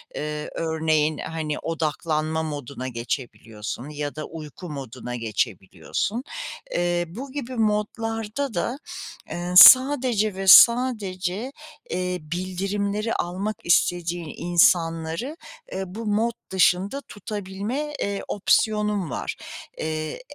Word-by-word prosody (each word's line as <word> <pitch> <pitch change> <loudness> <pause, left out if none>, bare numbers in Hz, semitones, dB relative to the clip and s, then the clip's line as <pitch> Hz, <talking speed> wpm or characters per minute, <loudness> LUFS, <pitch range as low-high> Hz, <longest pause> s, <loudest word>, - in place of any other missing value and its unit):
Eee, 150 0 -4
örneğin, 160 -2 +1
hani, 155 -2 -4
odaklanma 160 0 -1
moduna 145 -4 -5
geçebiliyorsun 115 0 -5
ya 145 -1 -4
da 155 0 -5
uyku 160 +2 -9
moduna 130 -4 -6
geçebiliyorsun. 115 - -2 0.5
Eee, 175 0 0
bu 255 +11 -8
gibi 260 -3 -5
modlarda 225 +3 -1
da, 235 +9 -1 0.5
eee, 175 +1 -3
sadece 250 -4 +8
ve 195 0 -4
sadece, 215 -2 +5 0.4
eee, 180 0 -1
bildirimleri 195 +6 -2
almak 195 +5 -2
istediğin 175 -1 +1
insanları, 170 - +2 0.4
eee, 190 - -2
bu 220 +5 -7
mod 220 +3 +1 0.2
dışında 190 +7 +2
tutabilme, 210 +8 -4
eee, 200 0 -2
opsiyonun 210 -2 +1
var. - - -4 0.4
Eee, 155 +2 -3
180 Hz, 100 wpm, -24 LUFS, 155-210 Hz, 0.5 s, sadece